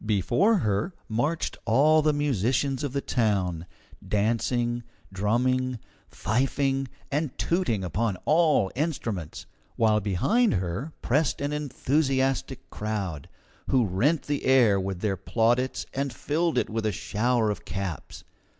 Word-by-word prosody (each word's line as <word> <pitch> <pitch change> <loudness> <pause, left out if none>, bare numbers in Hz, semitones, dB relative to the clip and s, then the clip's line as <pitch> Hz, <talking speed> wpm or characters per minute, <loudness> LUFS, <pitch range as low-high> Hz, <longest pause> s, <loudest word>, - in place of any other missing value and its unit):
Before 115 - +2
her 155 - 0
marched 145 +9 -1
all 145 +7 +4
the 155 0 +3
musicians 135 0 0
of 145 - -2
the 140 +1 -1
town, 95 -10 0 0.4
dancing, 120 +3 0 0.3
drumming, 125 +5 +1 0.3
fifing, 135 +5 0 0.2
and 145 -1 -2
tooting 145 - 0
upon 95 +3 -1
all 155 - +3
instruments, 120 - -3 0.3
while 110 -1 +3
behind 105 - +2
her 95 - -3
pressed 145 +3 +1
an 145 +1 -2
enthusiastic 135 -3 0
crowd, 100 -9 -4 0.4
who 130 -3 +3
rent 125 - +1
the 145 -1 -3
air 120 -7 +5
with 95 -1 -4
their 100 -3 0
plaudits 120 +5 0
and 140 0 -2
filled 160 +7 -1
it - - +2
with 110 0 -2
a - - +1
shower 110 +3 0
of 105 - -6
caps. 95 -6 -5
120 Hz, 125 wpm, -26 LUFS, 105-145 Hz, 0.4 s, air